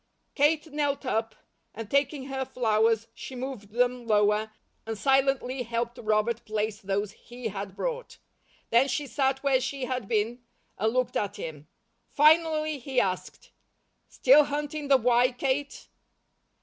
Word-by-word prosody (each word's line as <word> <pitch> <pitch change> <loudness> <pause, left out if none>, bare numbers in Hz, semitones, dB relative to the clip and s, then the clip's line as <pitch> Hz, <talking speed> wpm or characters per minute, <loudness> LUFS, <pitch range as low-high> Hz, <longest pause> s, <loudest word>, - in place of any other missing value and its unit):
Kate 305 +1 +1
knelt 290 -2 -1
up 225 -2 -1 0.4
and 225 0 -6
taking 280 +2 0
her 265 -1 -3
flowers, 225 -3 +1
she 235 +2 -9
moved 250 -5 -6
them 245 +1 0
lower, 210 0 +2 0.3
and 225 -1 -5
silently 270 +2 +1
helped 235 +1 -3
Robert 220 +1 0
place 215 -1 -3
those 200 +1 -2
he 240 +2 -7
had 195 -1 -6
brought. - - -4 0.5
Then 240 +4 +5
she 280 +2 -2
sat 270 0 0
where 270 -2 +3
she 265 0 -3
had 250 -4 -3
been, 225 +3 -1 0.4
and 220 +3 +2
looked 255 0 0
at 205 - -1
him. 150 -2 -7 0.4
Finally 310 0 +3
he 265 0 -1
asked: 185 -1 -3 0.6
"Still 300 -12 +5
hunting 295 +1 -4
the 275 -1 +6
'why,' 245 +1 +3
Kate?" 275 +2 -2
250 Hz, 140 wpm, -27 LUFS, 220-275 Hz, 0.6 s, the